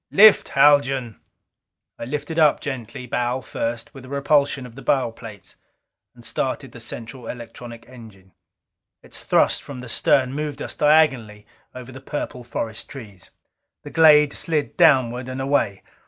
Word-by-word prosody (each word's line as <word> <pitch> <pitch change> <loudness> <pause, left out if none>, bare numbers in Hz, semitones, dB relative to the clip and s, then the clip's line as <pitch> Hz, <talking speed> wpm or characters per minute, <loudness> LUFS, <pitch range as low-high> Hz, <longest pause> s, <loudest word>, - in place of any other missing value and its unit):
"Lift, 215 +1 +6
Haljan!" 135 -5 +3 0.8
I - - -5
lifted 150 +5 -4
up 150 -2 +4
gently, 125 -4 -6
bow 125 +1 -2
first, 115 0 -5
with 135 - -12
a 130 - -12
repulsion 140 -1 +1
of 125 - -12
the 135 - -11
bow 130 -2 +1
plates. 110 -4 -12 0.6
And - - -15
started - - -3
the - - -12
central 115 +1 -8
electronic 115 -1 -9
engine. 110 -7 -15 0.7
Its - - -11
thrust - - +2
from 140 -3 -9
the 125 - -9
stern 130 +3 +1
moved 150 0 -4
us - - -6
diagonally 130 -9 +2 0.3
over 125 0 -9
the 130 0 -11
purple 135 -3 -5
forest 115 -1 -5
trees. 105 -9 -11 0.5
The - - -10
glade 150 -2 +6
slid 155 -3 -2
downward 130 -6 +3
and 130 +1 -5
away. 135 -8 0
130 Hz, 150 wpm, -22 LUFS, 115-145 Hz, 0.8 s, Lift